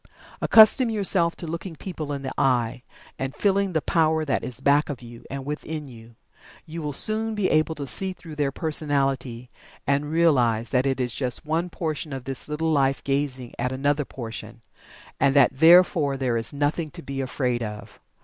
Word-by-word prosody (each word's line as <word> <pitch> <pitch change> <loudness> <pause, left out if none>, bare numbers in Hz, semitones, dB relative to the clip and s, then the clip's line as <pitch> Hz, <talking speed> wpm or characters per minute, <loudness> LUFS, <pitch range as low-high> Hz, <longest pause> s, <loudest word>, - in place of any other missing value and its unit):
Accustom 230 +3 +6
yourself 190 -5 +2
to - - -6
looking 170 +2 -6
people 155 -3 -6
in 140 -1 -4
the 130 - -4
eye, 125 -2 +1 0.4
and 135 +1 -4
feeling 200 +1 +1
the 160 - 0
power 160 -1 +1
that 140 - -1
is 125 -1 -4
back 145 +3 +2
of 130 -4 -6
you, 120 0 -12
and 135 -1 -6
within 150 +1 -5
you. 115 -3 -14 0.5
You 165 +1 -7
will 150 -1 -3
soon 215 +8 +1
be 205 -3 0
able 155 +1 +2
to 145 - -5
see 190 +8 0
through 170 -3 -11
their 145 -2 0
personality, 135 -6 -2 0.3
and 140 +1 0
realize 125 -9 +2
that 130 +1 +2
it 135 -1 -1
is 125 -3 -1
just 125 +4 -2
one 165 +3 -1
portion 155 -3 -4
of 135 -2 -6
the 135 +3 -2
One 160 0 +1
Life 135 -2 +1
gazing 135 -3 -2
at 125 - -1
another 145 +3 0
portion, 115 -3 -8 0.6
and 135 0 +3
that 140 -3 +6
therefore 160 -2 +5
there 130 -3 -1
is 115 0 -2
nothing 145 +3 -1
to 170 +2 -10
be 135 0 -4
afraid 125 -2 -2
of. 105 -2 -7
145 Hz, 185 wpm, -24 LUFS, 130-160 Hz, 0.6 s, Accustom